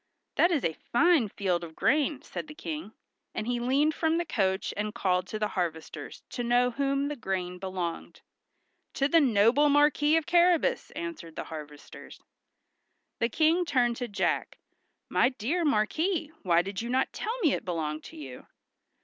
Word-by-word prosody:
"That 345 - +5
is 320 -7 0
a 160 - +1
fine 290 - +2
field 180 -3 -1
of 160 -1 -9
grain," 285 +2 +1
said - - -6
the 300 - -10
King; 305 -9 -6 0.4
and 215 - -2
he 245 0 -1
leaned 275 +6 +2
from 320 +1 +1
the 345 - -1
coach 190 - 0
and 210 +1 -3
called 185 -5 0
to 215 - -4
the 210 -1 -1
harvesters 170 -5 -4
to 245 - -3
know 245 +1 +3
to 235 - -19
whom 275 0 +1
the 295 - -3
grain 185 -6 -3
belonged. 185 -3 -5 0.7
"To 275 - +2
the 330 +2 +5
noble 250 +3 +4
Marquis 295 +2 +4
of 325 - -1
Carrabas!" 350 +7 +3
answered 320 - -6
the - - -4
harvesters. 150 -2 -10 1.0
The 230 - +1
King 320 +8 +3
turned 245 -7 +1
to 245 - -3
Jack. 205 -2 -1 0.5
"My 245 - +3
dear 270 +8 -2
Marquis, 310 - +1
why 175 -2 +3
did 195 +1 -4
you 235 - -5
not 260 +2 +1
tell 455 +3 -3
me 315 -8 +3
it - - -2
belonged 155 -4 -3
to - - -11
you?" 135 -4 -9
245 Hz, 175 wpm, -28 LUFS, 190-300 Hz, 1.0 s, That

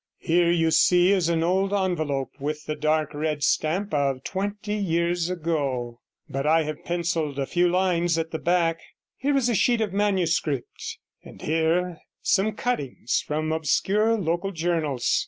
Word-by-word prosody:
Here 170 0 +2
you 165 -1 +2
see 180 +3 +5
is 185 -4 +2
an 165 -1 +1
old 190 +3 +1
envelope 155 -9 -1
with 150 +2 -4
the 155 - -2
dark 155 +1 0
red 150 0 -2
stamp 185 +8 0
of 135 -3 0
twenty 205 +2 -3
years 175 -3 0
ago, 140 -9 -2 0.3
but 135 +2 -3
I 160 +1 +4
have 155 0 -6
pencilled 170 -4 -1
a 140 - 0
few 175 +4 +2
lines 175 -2 +1
at 165 0 -2
the 160 - -3
back; 170 -1 +1 0.4
here 275 +1 0
is 255 -3 +2
a 240 - +1
sheet 235 +3 +3
of 210 -4 -1
manuscript, 175 -9 -1 0.3
and - - -13
here 165 +2 0 0.2
some 210 +2 +2
cuttings 195 - -2
from 155 +1 -1
obscure 200 +8 +2
local 175 0 -1
journals. 160 -7 0
170 Hz, 155 wpm, -25 LUFS, 155-190 Hz, 0.4 s, see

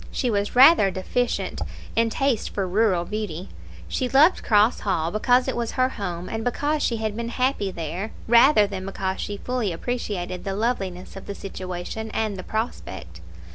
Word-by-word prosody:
She 250 - 0
was 205 +1 -1
rather 260 -5 +8
deficient 230 +6 -2 0.3
in 230 0 +3
taste 265 0 0
for 195 -2 -2
rural 185 -2 +2
beauty. 200 -3 -4 0.4
She 255 -2 -1
loved 300 +8 +5
Cross 215 +2 +3
Hall 170 -5 -1
because 245 +5 +3
it 265 - -1
was 235 -1 -2
her 255 0 +2
home, 180 -7 -5
and 225 0 -4
because 290 +5 0
she 235 - +1
had 220 -1 -2
been 235 +1 -3
happy 250 -4 0
there, 175 +4 -4 0.2
rather 235 -1 +6
than 195 -2 -5
because 190 -1 -3
she 205 - -4
fully 245 -3 -2
appreciated 185 -2 -3
the 195 -1 -3
loveliness 195 -5 -2
of 195 - -9
the 200 - -5
situation 185 +3 -6
and 215 -2 0
the 185 - -6
prospect. 95 - -5
210 Hz, 175 wpm, -24 LUFS, 185-245 Hz, 0.4 s, rather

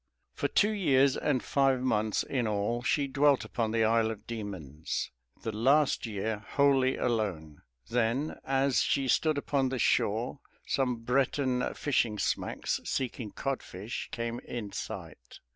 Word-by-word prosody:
For - - -1
two 210 +1 +3
years 140 -10 +3
and 140 -4 0
five 135 -2 +2
months 110 -4 +1
in 125 -4 -1
all 105 +3 0
she 140 +3 +1
dwelt 140 0 +3
upon 115 -2 -1
the 115 0 +2
Isle 110 0 +3
of 110 -1 -7
Demons, 95 - -5 0.3
the 115 - -2
last 135 +5 +3
year 110 0 -2
wholly 135 +2 +2
alone. 95 -11 -2 0.3
Then, 120 +5 0
as 135 -3 +2
she 135 -1 +1
stood 155 +3 +2
upon 140 -2 0
the 130 - -2
shore, 115 +3 +1 0.3
some 125 -4 0
Breton 130 0 +1
fishing 120 -7 +1
smacks, - - -1
seeking 125 -4 -3
codfish, 115 -6 -4
came 115 0 -3
in 110 -4 -6
sight. - - -7
120 Hz, 140 wpm, -30 LUFS, 110-135 Hz, 0.3 s, two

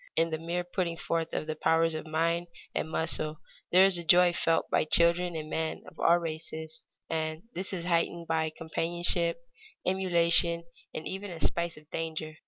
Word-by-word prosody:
In 165 0 +2
the 160 - -2
mere 170 +2 -3
putting 175 -2 -3
forth 165 -1 -2
of - - -3
the 155 0 -4
powers 165 +1 +2
of 155 0 -5
mind 165 +2 0 0.3
and 160 - -2
muscle 155 -1 0 0.3
there 185 +2 +7
is 190 -3 +5
a - - -5
joy 175 +2 +5
felt 165 -1 +1
by - - +3
children 170 +2 +4
and 155 -1 -5
men 160 0 -3
of 165 - -15
all 170 - +5
races, 160 -1 -6 0.3
and 160 0 -3
this 185 +2 -4
is 175 -3 -4
heightened 170 -1 0
by 160 -1 0
companionship, 170 +2 0 0.5
emulation, 170 -2 +3 0.3
and 155 - -5
even 195 +2 -5
by 175 - -7
a - - -10
spice 170 +1 -1
of 150 0 -16
danger. 160 -1 -4
165 Hz, 185 wpm, -29 LUFS, 160-175 Hz, 0.5 s, there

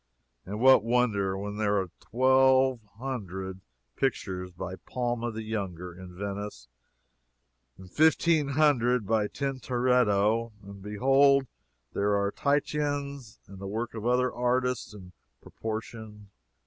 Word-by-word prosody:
And 105 +3 -5
what 130 -3 +6
wonder, 110 -5 +1
when 105 +1 -5
there 105 -1 +1
are 95 -3 -4
twelve 130 0 +3 0.2
hundred 95 -7 -5 0.3
pictures 95 -8 -2
by 95 +1 -6
Palma 120 0 -3
the 110 0 -6
Younger 95 -5 -4
in 90 0 -12
Venice 100 -4 -5 1.1
and 95 - -12
fifteen 160 - +3
hundred 130 -5 +2
by 110 0 +1
Tintoretto? 120 -4 +1
And 100 0 -11
behold 135 +6 +3 0.5
there 100 0 +1
are 100 0 0
Titians 140 -3 -1
and 100 -1 -12
the 95 - -6
works 110 +3 -3
of 110 0 -4
other 125 0 +2
artists 125 0 0
in 90 -3 -12 0.3
proportion. 110 -2 -7
115 Hz, 120 wpm, -28 LUFS, 100-130 Hz, 1.1 s, what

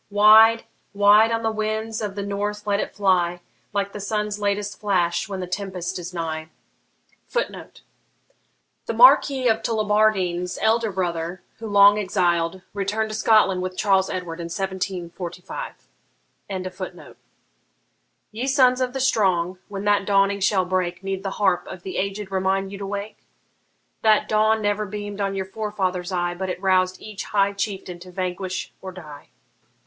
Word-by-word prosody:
Wide, 215 +2 +7 0.3
wide 205 +2 +6
on 230 0 -1
the 225 - +1
winds 220 +1 -2
of 205 -2 -4
the 200 - -3
north 205 +1 -3
let 200 -1 +1
it - - -4
fly, 180 -3 +2 0.3
Like 200 -1 -1
the 210 - -6
sun's 210 +1 -2
latest 205 0 -2
flash 180 -2 0
when 190 -2 -4
the - - -3
tempest 185 -1 -4
is 175 +1 -7
nigh! 160 -2 -4 0.8
[Footnote: - - -4 1.0
The - - -2
Marquis 275 - +6
of 225 -1 +2
Tullibardine's 210 -5 +1
elder 225 0 +2
brother, 175 -1 -3 0.2
who, 225 - -6
long 205 0 +6
exiled, 180 -2 0
returned 210 +2 -2
to - - -4
Scotland 215 -4 +3
with 185 0 -5
Charles 195 -2 +2
Edward 175 -2 -5
in 170 - -4
1745.] 180 - -5 2.4
Ye 235 +5 -4
sons 260 -2 +4
of 250 -1 -1
the 265 - -3
strong, 185 -8 +1
when 200 0 -6
that 205 -1 +2
dawning 200 0 +3
shall 190 -1 +2
break, 180 0 -2
Need 195 -1 -3
the 195 - -3
harp 190 -4 +1
of 180 - -9
the 190 - -5
aged 200 0 -3
remind 190 0 0
you 200 - -7
to 200 - -5
wake? 200 +2 -5 0.8
That 215 -1 +4
dawn 215 0 +2
never 205 +1 0
beam'd 205 0 -6
on 195 0 -1
your 190 -1 -2
forefathers' 190 -3 -3
eye, 175 -1 -1
But 190 +1 -4
it 180 - -4
roused 185 -1 +2
each 210 -2 -7
high 200 -1 +1
chieftain 195 -3 -4
to 180 +1 -12
vanquish 185 0 -4
or 190 - -7
die. 155 -6 -11
195 Hz, 155 wpm, -23 LUFS, 185-210 Hz, 2.4 s, Wide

